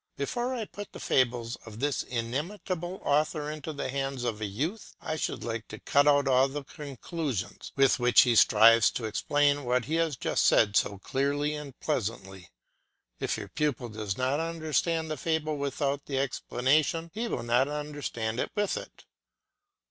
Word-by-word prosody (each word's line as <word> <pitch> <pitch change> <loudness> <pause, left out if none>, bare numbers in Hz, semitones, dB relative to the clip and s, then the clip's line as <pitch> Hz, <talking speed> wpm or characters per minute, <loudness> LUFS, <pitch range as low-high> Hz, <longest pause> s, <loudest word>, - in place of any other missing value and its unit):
Before 240 - -2
I 230 -3 -3
put 205 0 -9
the - - -8
fables 120 -2 +1
of 110 -1 -12
this 145 +1 0
inimitable 170 - -3
author 150 +1 +1
into 155 +1 -6
the 145 -3 -4
hands 135 -1 -2
of 115 -3 -2
a 105 - -1
youth, 155 - -4
I 155 - -3
should 155 - -3
like 115 -2 -4
to - - -9
cut 145 +1 +3
out 145 -1 +4
all 130 0 +5
the 145 +1 -5
conclusions 140 - -5
with 135 -2 +4
which 120 0 +6
he 125 -2 +3
strives 115 +1 +7
to 115 - -3
explain 145 +5 +1
what 125 -1 +1
he 155 - -4
has 165 -3 +1
just - - +1
said 105 -2 +4
so 100 - +2
clearly 140 +7 -1
and 145 -3 -8
pleasantly. 95 - -3 0.7
If - - -1
your - - -7
pupil 145 -6 -1
does 105 -3 -4
not 130 +3 +1
understand 165 0 -1
the 155 - -2
fable 155 -2 -1
without 140 0 -2
the 135 - -2
explanation, 140 +5 +1
he 230 +3 -2
will - - -3
not 120 +3 +3
understand 145 -6 -3
it - - -1
with 205 -1 0
it. - - -10
140 Hz, 170 wpm, -29 LUFS, 120-155 Hz, 0.7 s, strives